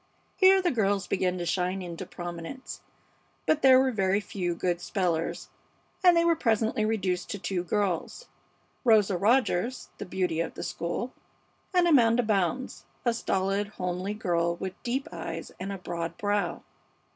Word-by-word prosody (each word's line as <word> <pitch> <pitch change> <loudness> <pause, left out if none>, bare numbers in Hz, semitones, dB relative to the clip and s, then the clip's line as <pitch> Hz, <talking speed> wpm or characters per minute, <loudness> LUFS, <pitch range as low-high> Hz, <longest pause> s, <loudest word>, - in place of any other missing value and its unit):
Here 380 -1 +6
the 355 - +2
girls 200 -5 +1
began 185 0 0
to 175 - -3
shine 185 +2 -1
into 175 +1 -6
prominence, 175 +8 -7 0.6
but 310 -1 +2
there 260 -1 +7
were 260 0 +2
very 195 -3 +1
few 185 -5 -3
good 175 0 -1
spellers, 175 -4 -1 0.5
and 355 -2 +7
they 335 - +4
were 335 -1 +4
presently 225 -6 +1
reduced 190 -5 -1
to - - -3
two 185 -2 -2
girls 200 - -2 0.6
Rosa 215 -5 +4
Rogers, 235 +2 +1
the - - -6
beauty 180 -3 -1
of 170 - -2
the - - -5
school, 205 +9 -3 0.6
and 360 -2 +4
Amanda 245 -6 +5
Bounds, 215 +4 -1 0.2
a 235 - +3
stolid, 195 -2 0
homely 185 0 -3
girl 170 -5 0
with 190 +2 -6
deep 260 +3 -2
eyes - - -6
and 190 +2 -4
a 195 - -4
broad 170 -2 -5
brow. 205 0 -1
195 Hz, 155 wpm, -28 LUFS, 180-235 Hz, 0.6 s, there